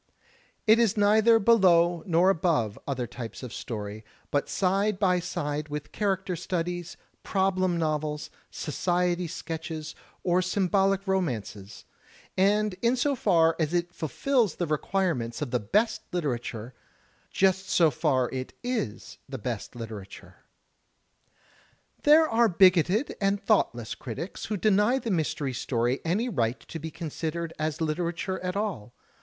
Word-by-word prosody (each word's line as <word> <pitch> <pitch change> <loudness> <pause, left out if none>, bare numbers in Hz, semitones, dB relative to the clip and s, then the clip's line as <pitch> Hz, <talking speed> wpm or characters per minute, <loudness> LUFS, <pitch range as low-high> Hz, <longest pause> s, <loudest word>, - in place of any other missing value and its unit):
It 220 +1 +6
is 225 -3 +2
neither 215 +3 +5
below 175 -6 +4
nor 175 +2 +4
above 160 - 0
other 130 -3 -2
types 120 0 -8
of 125 -2 -7
story, 105 -2 -6 0.3
but 145 - 0
side 195 +2 +1
by 185 -2 +2
side 150 -3 -3
with 150 0 -5
character 190 -3 -1
studies, 175 0 -3 0.2
problem 185 -2 +1
novels, 155 -2 -2 0.2
society 175 +2 -1
sketches 160 -1 -5 0.3
or 180 0 +2
symbolic 195 +1 +1
romances; 115 - -3 0.5
and 205 +2 +2
in 235 +2 +3
so 280 +3 +1
far 165 -8 +3
as 160 +1 0
it 175 0 -1
fulfills 225 - 0
the 175 - -1
requirements 150 -6 -1
of 145 -5 -4
the 125 - +1
best 210 - +1
literature, 125 -8 -3 0.6
just 190 0 +1
so 165 -4 +4
far 130 -5 +1
it 130 -1 -5
is 240 - -3
the 135 - -5
best 120 0 -5
literature. 110 -4 -9 1.6
There 310 +2 +6
are 230 -2 +3
bigoted 185 - +4
and 200 0 +2
thoughtless 120 - +1
critics 150 - -6
who 210 - -2
deny 210 +5 +3
the 235 -4 -3
Mystery 150 -5 -1
Story 120 +1 0
any 195 +9 0
right 120 - 0
to 165 - -8
be 160 +1 -5
considered 165 +1 -4
as 155 +1 -2
literature 170 +4 -2
at 180 0 -3
all. 185 - -3
175 Hz, 135 wpm, -27 LUFS, 145-195 Hz, 1.6 s, It